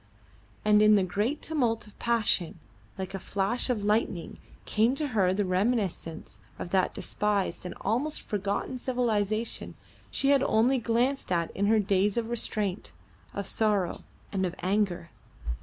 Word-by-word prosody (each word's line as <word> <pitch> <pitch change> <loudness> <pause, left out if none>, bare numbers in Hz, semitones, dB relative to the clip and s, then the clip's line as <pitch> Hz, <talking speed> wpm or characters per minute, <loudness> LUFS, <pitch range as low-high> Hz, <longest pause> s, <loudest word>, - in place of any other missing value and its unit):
And 210 0 +5
in 215 0 +7
the 200 - +4
great 210 - -1
tumult 245 -8 0
of 210 - -18
passion, 220 -8 +1 0.4
like 190 0 -5
a 195 - -3
flash 200 +7 -1
of 225 -5 0
lightning 205 -5 0 0.3
came 225 +5 +2
to 295 +1 -2
her 195 -6 +2
the 200 +2 0
reminiscence 185 -4 -1 0.2
of 175 - -6
that 190 -1 +2
despised 200 -4 -1
and - - -7
almost 280 +8 -1
forgotten 205 +5 -2
civilisation 225 -3 -1 0.3
she 275 - +1
had 280 -2 +5
only 250 +2 +3
glanced 240 +2 0
at 170 -2 +1
in 200 +1 +1
her 220 +1 +4
days 200 0 +2
of 235 0 -1
restraint, 210 -4 -2 0.4
of 200 - -3
sorrow, 205 -4 +1 0.3
and 190 -2 -1
of 180 -1 -2
anger. 185 -3 0
210 Hz, 150 wpm, -28 LUFS, 190-235 Hz, 0.4 s, in